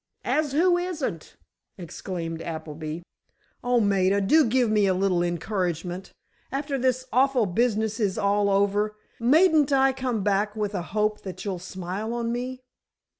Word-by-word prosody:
"As 300 -3 0
who 350 +3 +3
isn't?" 315 - -4 0.4
exclaimed 170 -2 -5
Appleby. 160 0 -6 0.6
"Oh, 245 0 +2
Maida, 200 -2 +2
do 290 +11 +4
give 250 +1 +2
me 210 -2 +3
a 190 - +2
little 185 -2 +1
encouragement. 175 0 -2 0.4
After 275 0 -2
this 255 0 0
awful 260 -2 +3
business 220 +2 0
is 200 -4 0
all 200 0 +2
over, 205 +2 +1 0.2
mayn't 300 +4 +4
I 270 -1 +4
come 255 -5 -2
back 205 +1 +1
with 210 -1 -2
a 185 - -2 0.2
hope 210 0 +1
that 190 +1 -7
you'll 190 -3 -3
smile 190 +5 -5
on 235 -1 -2
me?" 250 +2 -4
210 Hz, 145 wpm, -25 LUFS, 185-255 Hz, 0.6 s, do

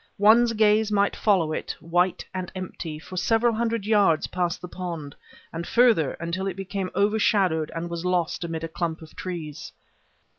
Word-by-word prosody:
One's 230 +3 +5
gaze 215 0 +3
might 200 -1 +2
follow 180 -7 +2
it, - - -4
white 175 +2 0
and 185 -1 -4
empty, 170 -4 -6
for 185 +4 -9
several 225 +5 +2
hundred 230 -2 -1
yards 205 -7 +3
past 175 -2 -2
the 180 - -8
pond, 170 -6 -6 0.4
and 170 +1 -5
further, 230 - +4
until 170 +3 -3
it 190 - -3
became 195 0 -4
overshadowed 200 -6 +2
and 165 +1 -3
was 170 0 -5
lost 180 -2 0
amid 165 -1 -4
a - - -2
clump 165 0 -3
of 155 - -15
trees. 160 -5 -6
180 Hz, 165 wpm, -25 LUFS, 165-210 Hz, 0.4 s, One's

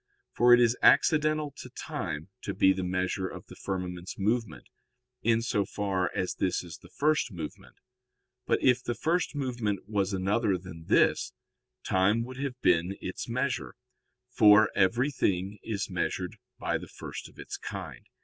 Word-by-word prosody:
For 120 +1 +5
it 120 - +9
is 120 0 +4
accidental 155 0 +4
to 125 - -9
time 100 - -5
to - - -4
be 95 - +5
the 95 0 -3
measure 95 +1 -1
of - - -9
the - - -13
firmament's 90 -2 -5
movement, 110 +3 -1 0.5
in 115 0 +2
so 115 -4 +1
far 95 -3 -1
as 90 - -1
this 90 -1 -1
is 85 -2 -10
the 90 - -16
first 145 +3 +1
movement. 80 -5 -8 0.7
But - - +1
if 125 -1 +4
the 120 - -2
first 165 +7 0
movement 120 -8 -2
was 100 -2 0
another 100 +1 +1
than 90 -3 -11
this, - - +3 0.5
time 100 +5 +2
would 130 +2 -8
have 135 -2 -4
been 90 +4 +2
its 95 - -5
measure, 130 +2 -2 0.6
for 110 -2 +6
everything 100 -3 +1
is 105 -3 -3
measured 90 -1 -3 0.2
by - - -1
the - - -9
first - - -8
of - - -22
its - - -6
kind. - - -7
105 Hz, 160 wpm, -29 LUFS, 95-125 Hz, 0.7 s, it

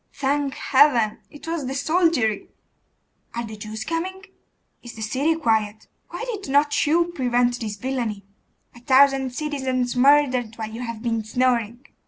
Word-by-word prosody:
Thank 280 0 -1
Heaven! 260 -6 +3
it 295 - -13
was 325 -5 -3
the 265 - -4
soldiery. 285 - +1 0.9
'Are 235 0 -3
the 220 -1 -8
Jews 215 +1 -6
coming?' 365 +6 -4 0.6
'Is 240 -1 -10
the 220 - -6
city 275 +9 0
quiet?' 220 -7 0 0.2
'Why 350 +7 -5
did 420 - -5
not 290 +2 +2
you 340 +3 +2
prevent 245 -3 +1
this 215 -3 -4
villainy?' 230 -4 -3 0.5
'A 240 - -14
thousand 265 +1 +4
citizens 260 -3 -2
murdered 255 -3 +3
while 220 -1 -6
you 230 +2 -7
have 230 -2 -6
been 230 -2 -1
snoring! 240 +1 0
255 Hz, 150 wpm, -23 LUFS, 225-290 Hz, 0.9 s, thousand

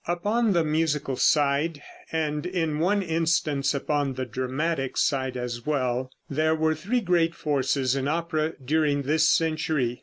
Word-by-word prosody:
Upon 205 +6 +1
the 170 -2 +3
musical 150 -3 0
side, 145 +3 +2 0.3
and 155 0 -1
in 165 -4 -1
one 200 +4 +2
instance 160 -4 0
upon 140 -1 -1
the 130 0 -3
dramatic 130 +4 -2
side 130 -3 0
as 120 -1 -4
well, 130 -3 -1 0.2
there 155 +3 +1
were 160 0 +1
three 200 +11 -1
great 170 -4 +1
forces 135 -3 0
in 135 0 -1
opera 160 0 -1
during 145 0 +1
this 155 +3 +3
century. 155 -6 0
155 Hz, 145 wpm, -26 LUFS, 135-165 Hz, 0.3 s, the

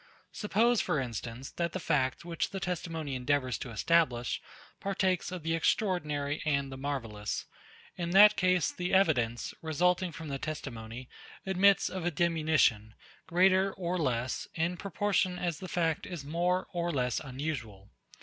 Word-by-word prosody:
Suppose, 230 +2 +2
for 150 - 0
instance, 120 +1 -5
that 170 -1 -2
the 185 - -2
fact, 135 -2 0
which 170 -1 -2
the 195 - -5
testimony 165 -5 -3
endeavours 130 -1 0
to 125 - -6
establish, 120 0 +1 0.4
partakes 190 -2 0
of 180 -3 -6
the 165 +1 0
extraordinary 155 -5 0
and 140 -3 0
the - - -6
marvellous; 115 -7 -3 0.5
in 170 -1 -2
that 205 +4 +8
case, 185 -3 +2
the 180 +1 -1
evidence, 120 -11 +2
resulting 175 +3 +1
from 160 0 -8
the 135 -1 -3
testimony, 125 -5 -6 0.4
admits 190 +1 +4
of 185 -2 -4
a 175 - +2
diminution, 155 -10 +2 0.3
greater 190 +2 +4
or 180 -1 -2
less, 130 -6 -1
in 170 +2 0
proportion 195 0 0
as 175 -3 -2
the 190 - -6
fact 165 -3 0
is 170 -6 -6
more 175 +4 0
or 175 0 -1
less 125 -5 0
unusual. 125 -8 -5
165 Hz, 150 wpm, -30 LUFS, 135-180 Hz, 0.5 s, that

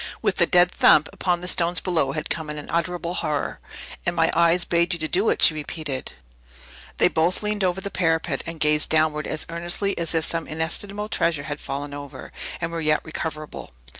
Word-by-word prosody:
With - - +1
the - - +4
dead 175 0 +4
thump 150 - +5
upon 175 -2 0
the 180 - -5
stones 175 -1 +3
below 160 -7 0
had 155 - -3
come 160 -2 -3
an 150 - -5
unutterable 170 +3 -2
horror. 150 -5 -2 0.4
"And 175 - -1
my 165 -1 +3
eyes 170 +1 +3
bade 170 +1 +1
you 155 - -1
do 190 +7 +2
it!" - - +5
repeated 150 -3 -5
she. - - -14 0.8
They - - +5
both 170 +5 +1
leaned 210 -1 -1
over 185 +1 0
the 200 - -5
parapet, 165 -3 0
and 165 -1 -5
gazed 150 0 +3
downward 155 -1 +1
as 155 - -2
earnestly 175 +4 -1
as 165 0 -1
if 160 -1 +4
some 165 -1 0
inestimable 195 +7 -2
treasure 165 -7 0
had 145 0 -5
fallen 140 +1 -5
over, 145 -1 -9 0.3
and 165 0 -3
were 165 -1 -3
yet 155 -1 +2
recoverable. 155 - -5
165 Hz, 195 wpm, -23 LUFS, 155-175 Hz, 0.8 s, thump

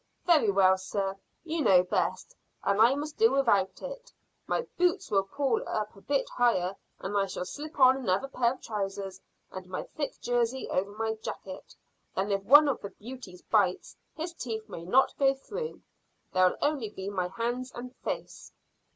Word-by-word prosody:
"Very 310 -11 +5
well, 190 -1 +4
sir; 195 0 -2 0.3
you 330 -1 -2
know 185 -9 +6
best, 180 - -1 0.3
and 200 +2 +2
I 240 +4 +6
must 295 +1 -5
do 225 +2 +6
without 205 -9 +2
it. - - -7 0.4
My - - 0
boots 360 +2 +1
will 195 -1 +3
pull 270 +2 0
up 215 -1 -2
a 195 - -15
bit 280 +4 0
higher, 195 -6 +1 0.2
and 200 +2 -5
I'll 200 -1 +2
slip 290 +13 -6
on 260 0 +7
another 240 0 0
pair 245 -3 +1
of 260 - -15
trousers 195 -3 -4 0.3
and 185 -1 -8
my 185 - -3
thick 290 -2 -5
jersey 245 +1 0
over 195 +2 0
my 220 0 -1
jacket; 190 -1 -7 0.4
then 195 +2 0
if 195 0 +1
one 290 +7 +8
of 275 - 0
the 200 - -5
beauties 215 -6 -10
bites, 200 -5 +1 0.2
his 335 +2 -4
teeth 225 -8 -5
may 170 - -8
not 260 +9 +4
go 270 -1 +4
through. 465 - -6 0.5
There'll 185 0 +4
only 285 -7 0
be 190 -1 -7
my 185 -3 -1
hands 240 +6 -3
and 250 +1 -8
face." - - -6
225 Hz, 175 wpm, -29 LUFS, 195-275 Hz, 0.5 s, one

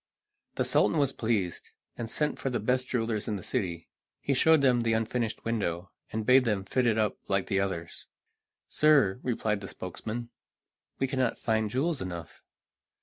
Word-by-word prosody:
The - - 0
Sultan - - +3
was 140 -2 +2
pleased, 105 -7 -2 0.2
and 115 -1 -5
sent 150 +5 -1
for 135 - -1
the 120 - -1
best 125 +4 0
jewelers 115 -3 -1
in 105 - -1
the 95 - -6
city. 85 -3 -2 0.3
He 140 - 0
showed 160 +3 +5
them 125 -3 +4
the 115 -1 +1
unfinished 115 +1 -1
window, 100 -5 -2 0.2
and 110 0 -3
bade 130 +2 +6
them 105 -5 -1
fit 125 +4 +1
it 110 -1 +2
up 110 -1 0
like 95 -1 +1
the 95 - 0
others. 90 -4 -4 0.6
"Sir," 140 -10 +4
replied 110 -4 -1
their 100 - -6
spokesman, 110 +6 -6 0.7
"we 135 - +1
cannot 130 -1 0
find 110 -1 0
jewels 140 +6 0
enough." 85 -3 -7
115 Hz, 170 wpm, -29 LUFS, 100-130 Hz, 0.7 s, bade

